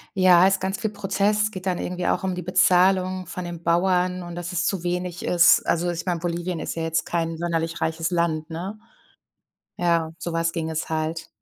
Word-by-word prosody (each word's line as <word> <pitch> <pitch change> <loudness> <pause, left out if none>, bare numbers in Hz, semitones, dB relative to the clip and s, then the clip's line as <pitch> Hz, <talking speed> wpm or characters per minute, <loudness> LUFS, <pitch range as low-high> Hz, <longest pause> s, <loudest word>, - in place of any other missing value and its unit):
Ja, 185 -1 +6
ist 195 -1 +1
ganz 190 +1 -2
viel 220 - -2
Prozess. 205 +1 +1
Es 215 - 0
geht 185 -3 -8
dann 180 -2 0
irgendwie 180 0 -3
auch - - 0
um 185 -1 -1
die 180 - -4
Bezahlung 185 +1 +3
von 180 0 -6
den 170 -1 -7
Bauern 180 +1 +1
und 175 0 -8
dass 175 +1 -5
es 175 0 0
zu 185 -2 -1
wenig 180 0 -3
ist. 175 0 +5
Also, 175 +1 +1
ich 170 +1 -5
meine, 175 -2 -1
Bolivien 175 0 -3
ist - - -4
ja 165 - -3
jetzt 165 0 0
kein 165 -1 -2
sonderlich 165 -1 -2
reiches 165 +2 -1
Land, 165 -2 0
ne? 190 +6 -5 1.0
Ja, 170 -2 +1
so 170 0 -5
was 165 0 0
ging 160 -2 -3
es 160 0 -3
halt. 160 +1 -2
175 Hz, 210 wpm, -24 LUFS, 165-185 Hz, 1.0 s, Ja